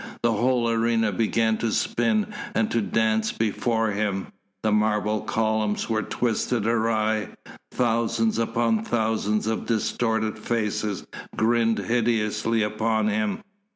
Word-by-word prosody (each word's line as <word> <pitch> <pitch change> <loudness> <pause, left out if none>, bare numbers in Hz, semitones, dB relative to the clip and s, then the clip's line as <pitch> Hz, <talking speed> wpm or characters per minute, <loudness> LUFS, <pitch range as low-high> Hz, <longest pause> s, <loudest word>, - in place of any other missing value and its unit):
The 120 - +3
whole 120 +2 +1
arena 115 -1 +1
began 110 +2 +1
to 115 - 0
spin 215 - 0 0.2
and 110 -1 +1
to 115 - +1
dance 110 +1 +1
before 110 0 0
him, 100 -2 -2 0.3
the 110 - +2
marble 105 0 +1
columns 110 0 -1
were 110 -1 +1
twisted 115 -1 -1
awry, 110 -2 +1 0.4
thousands 115 -1 +1
upon 115 -1 +1
thousands 110 -2 0
of 110 0 -2
distorted 110 -1 0
faces 105 -3 -2 0.3
grinned 115 0 +2
hideously 115 -1 0
upon 110 0 0
him. 105 - -1
110 Hz, 120 wpm, -25 LUFS, 110-115 Hz, 0.4 s, The